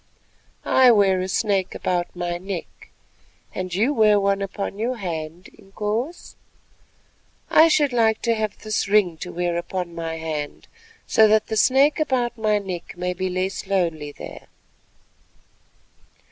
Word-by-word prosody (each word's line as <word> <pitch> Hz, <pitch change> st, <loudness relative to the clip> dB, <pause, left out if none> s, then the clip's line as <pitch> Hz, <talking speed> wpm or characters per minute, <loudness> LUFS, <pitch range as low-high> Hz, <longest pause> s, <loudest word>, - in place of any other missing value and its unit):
"I 260 Hz, -1 st, +5 dB
wear 195 Hz, -5 st, +4 dB
a 185 Hz, -, -2 dB
snake 195 Hz, -1 st, 0 dB
about 175 Hz, -1 st, -2 dB
my 175 Hz, 0 st, -3 dB
neck, 185 Hz, -2 st, -7 dB, 0.6 s
and 185 Hz, -1 st, -4 dB
you 220 Hz, -, +1 dB
wear 215 Hz, -4 st, +4 dB
one 200 Hz, 0 st, +1 dB
upon 200 Hz, +1 st, -4 dB
your 245 Hz, +3 st, -1 dB
hand, 170 Hz, -2 st, -5 dB
Inkoos. 215 Hz, -, -4 dB, 1.2 s
I 320 Hz, -, +7 dB
should 295 Hz, -4 st, +2 dB
like 225 Hz, -2 st, +2 dB
to 235 Hz, -, +2 dB
have 215 Hz, -2 st, -3 dB
this 215 Hz, -2 st, -2 dB
ring 200 Hz, -5 st, +3 dB
to 180 Hz, -, -7 dB
wear 175 Hz, 0 st, -1 dB
upon 175 Hz, 0 st, -4 dB
my 165 Hz, -1 st, -4 dB
hand, 155 Hz, -2 st, -5 dB, 0.4 s
so 220 Hz, -, +5 dB
that 215 Hz, +1 st, +2 dB
the 220 Hz, -, -1 dB
snake 270 Hz, +7 st, +4 dB
about 255 Hz, -6 st, 0 dB
my 215 Hz, -2 st, +1 dB
neck 185 Hz, -3 st, -6 dB
may 180 Hz, 0 st, -2 dB
be 185 Hz, +1 st, -3 dB
less 185 Hz, +1 st, -3 dB
lonely 165 Hz, -6 st, -1 dB
there." -, -, -10 dB
195 Hz, 145 wpm, -23 LUFS, 175-220 Hz, 1.2 s, I